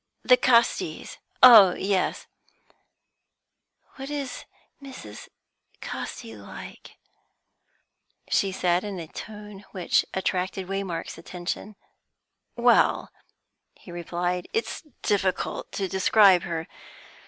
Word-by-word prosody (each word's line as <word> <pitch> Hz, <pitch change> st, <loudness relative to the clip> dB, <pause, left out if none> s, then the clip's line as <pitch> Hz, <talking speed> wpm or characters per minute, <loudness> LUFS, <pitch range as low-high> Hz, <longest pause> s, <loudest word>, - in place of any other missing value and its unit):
"The 250 Hz, -, +6 dB
Castis? 235 Hz, -2 st, +1 dB, 0.2 s
Oh 215 Hz, -8 st, +9 dB
yes." 195 Hz, -1 st, -1 dB, 1.7 s
"What 270 Hz, +1 st, -7 dB
is 285 Hz, -3 st, -5 dB, 0.4 s
Mrs. 255 Hz, -, -10 dB, 0.5 s
Casti 110 Hz, -1 st, -7 dB
like?" 100 Hz, -1 st, -11 dB, 1.3 s
she 195 Hz, -, +1 dB
said, 180 Hz, -1 st, 0 dB
in 200 Hz, -3 st, -5 dB
a 165 Hz, -, -6 dB
tone 210 Hz, +3 st, -10 dB
which 185 Hz, -3 st, +1 dB
attracted 190 Hz, 0 st, -2 dB
Waymark's 190 Hz, -4 st, -4 dB
attention. 180 Hz, +4 st, -6 dB, 0.8 s
"Well," 240 Hz, 0 st, +3 dB, 0.6 s
he 180 Hz, -, -14 dB
replied, 175 Hz, +1 st, -3 dB
"it's 450 Hz, -, -2 dB, 0.2 s
difficult 195 Hz, -3 st, -1 dB
to 195 Hz, -, -2 dB
describe 190 Hz, 0 st, +5 dB
her. 165 Hz, -1 st, -4 dB
190 Hz, 90 wpm, -25 LUFS, 175-215 Hz, 1.7 s, Oh